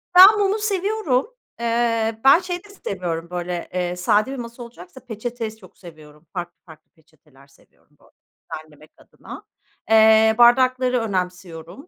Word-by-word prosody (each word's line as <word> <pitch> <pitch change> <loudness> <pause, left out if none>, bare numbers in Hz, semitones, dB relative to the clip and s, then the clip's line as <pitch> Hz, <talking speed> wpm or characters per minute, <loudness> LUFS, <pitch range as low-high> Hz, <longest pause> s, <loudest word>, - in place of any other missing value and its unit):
Ben 395 +4 +9
mumu 405 +2 +1
seviyorum. 400 -9 -1 0.3
Eee, 230 -1 -1
ben 275 +5 +7
şeyi 360 0 -6
de 410 - -18
seviyorum, 175 - -5
böyle, 175 -1 -5
eee, 180 -1 -2
sade 210 +6 +1
bir - - -5
masa 235 0 -8
olacaksa 230 -1 -13
peçete 230 -1 -6
s 220 - -18
çok 185 -4 -19
seviyorum. 155 -3 -16
Farklı 175 -1 -6
farklı 160 -2 -18
peçeteler 150 -3 -25
seviyorum, 140 - -29
böyle, - - -25 0.4
düzenlemek 155 -1 -11
adına. - - -13 0.5
Eee, 220 0 +5
bardakları 255 +1 +4
önemsiyorum. 180 - -5
220 Hz, 140 wpm, -21 LUFS, 175-255 Hz, 0.5 s, Ben